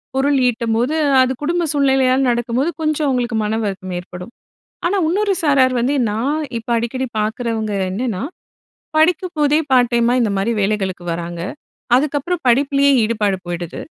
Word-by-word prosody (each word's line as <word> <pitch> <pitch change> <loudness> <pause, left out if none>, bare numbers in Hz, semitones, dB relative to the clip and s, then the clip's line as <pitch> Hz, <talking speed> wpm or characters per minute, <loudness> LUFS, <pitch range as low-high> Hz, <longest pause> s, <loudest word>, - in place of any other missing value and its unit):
பொருள் 275 +1 +2
ஈட்டம்போது, 235 +4 0 0.3
அது 255 0 +2
குடும்ப 340 +4 0
சூழ்நிலையால 265 -2 +3
நடக்கும்போது, 240 +5 0
கொஞ்சம் 310 -1 0
அவங்களுக்கு 245 -4 0
மனவருத்தம் 210 -3 -3
ஏற்படும். 180 +4 -9 0.6
ஆனா, 395 +3 +1
இன்னொரு 400 +3 +1
சாரார் 265 -4 +3
வந்து 265 +4 +1 0.2
நான் 255 +9 -1 0.2
இப்ப 230 - -13
அடிக்கடி 255 +3 -2
பார்க்குறவங்க 220 0 -2 0.2
என்னன்னா, 220 0 -3 0.7
படிக்கும் 350 +3 +2
போதே 295 +1 +3
பார்ட் 245 -1 +4
டைமா 235 +1 +2
இந்த 220 -3 +1
மாரி 210 +5 0
வேலைகளுக்கு 195 -3 -1
வராங்க. 170 0 -5 0.6
அதுக்கப்புறம் 300 +5 0
படிப்பிலயே 280 +3 +3
ஈடுபாடு 210 -3 0
போயிடுது. 175 -1 -5
245 Hz, 135 wpm, -18 LUFS, 215-285 Hz, 0.7 s, பார்ட்